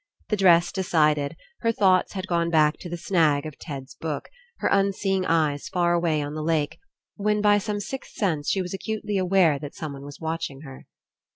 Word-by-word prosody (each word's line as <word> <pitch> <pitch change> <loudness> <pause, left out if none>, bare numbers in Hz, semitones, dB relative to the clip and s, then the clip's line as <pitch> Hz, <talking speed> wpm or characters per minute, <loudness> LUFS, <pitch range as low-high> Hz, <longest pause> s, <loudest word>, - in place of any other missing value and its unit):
The 215 - +2
dress 175 -3 +5
decided, 155 -6 +1 0.2
her 230 - +2
thoughts 190 -4 +3
had 190 -1 -4
gone 170 -2 0
back 155 -2 +3
to 175 - -8
the 175 - -4
snag 160 -5 +2
of 155 -3 -8
Ted's 135 -4 -7
book, 160 -2 -5 0.3
her - - -1
unseeing 195 -1 +1
eyes 155 -3 +1
far 175 -2 +2
away 165 -3 +1
on 145 +1 -5
the 155 - -4
lake, 155 -2 0 0.4
when 210 0 +1
by 205 0 +4
some 205 0 -3
sixth 265 +6 -6
sense 160 -8 -1
she 190 - +1
was 180 - -6
acutely 210 0 -2
aware 180 -5 +3
that 145 0 -8
someone 140 -4 -6
was 145 0 -10
watching 160 -4 -4
her. 135 -3 -11
170 Hz, 190 wpm, -25 LUFS, 150-195 Hz, 0.4 s, dress